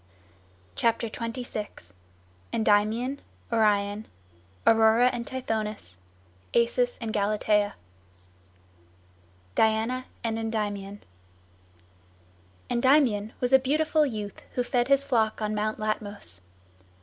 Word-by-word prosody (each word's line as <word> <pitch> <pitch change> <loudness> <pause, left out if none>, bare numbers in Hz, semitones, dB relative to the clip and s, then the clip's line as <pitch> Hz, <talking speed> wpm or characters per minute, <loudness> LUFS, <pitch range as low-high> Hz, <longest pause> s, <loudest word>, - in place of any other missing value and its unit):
CHAPTER 230 - +1
XXVI 225 - -6 0.6
ENDYMION 220 +5 +1 0.3
ORION 210 -1 +2 0.6
AURORA 225 +2 +5
AND 240 0 -4
TITHONUS 215 - -4 0.6
ACIS 245 +1 +2
AND 225 -2 -4
GALATEA 210 0 +1 1.8
DIANA 225 - +1 0.2
AND 225 -1 -1
ENDYMION 205 -3 -3 1.7
Endymion 240 -4 +3
was 250 +1 0
a 265 - +9
beautiful 305 +3 +2
youth 215 -7 -4
who 250 - 0
fed 245 -1 +1
his 275 0 +4
flock 225 -6 +1
on 215 -1 -1
Mount 215 +1 -1
Latmos. 215 - -3
225 Hz, 90 wpm, -27 LUFS, 210-245 Hz, 1.8 s, a